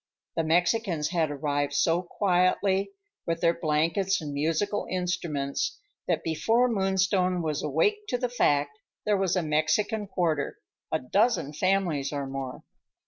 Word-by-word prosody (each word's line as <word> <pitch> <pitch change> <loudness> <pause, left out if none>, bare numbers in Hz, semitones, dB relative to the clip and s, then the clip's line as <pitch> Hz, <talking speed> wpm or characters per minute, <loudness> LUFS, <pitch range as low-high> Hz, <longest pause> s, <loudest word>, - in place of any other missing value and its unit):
The 165 - +1
Mexicans 170 0 +1
had 165 -3 +1
arrived 145 0 -1
so 165 +4 +2
quietly, 190 +1 +1 0.4
with 165 0 0
their 170 -1 +4
blankets 170 +4 +1
and 150 -2 -5
musical 165 +8 0
instruments, 175 -6 -2 0.3
that 170 -3 0
before 225 +10 +2
Moonstone 190 -4 +1
was 155 -2 -1
awake 415 - +1
to 245 - 0
the 250 0 -1
fact, 145 -11 +1 0.3
there 210 - +3
was 195 -2 +1
a 180 - +1
Mexican 160 +8 +1
quarter; 165 -7 -1 0.3
a 160 - +2
dozen 195 - +1
families 175 -5 0
or 140 -2 -3
more. 135 -1 -6
170 Hz, 140 wpm, -27 LUFS, 150-195 Hz, 0.4 s, their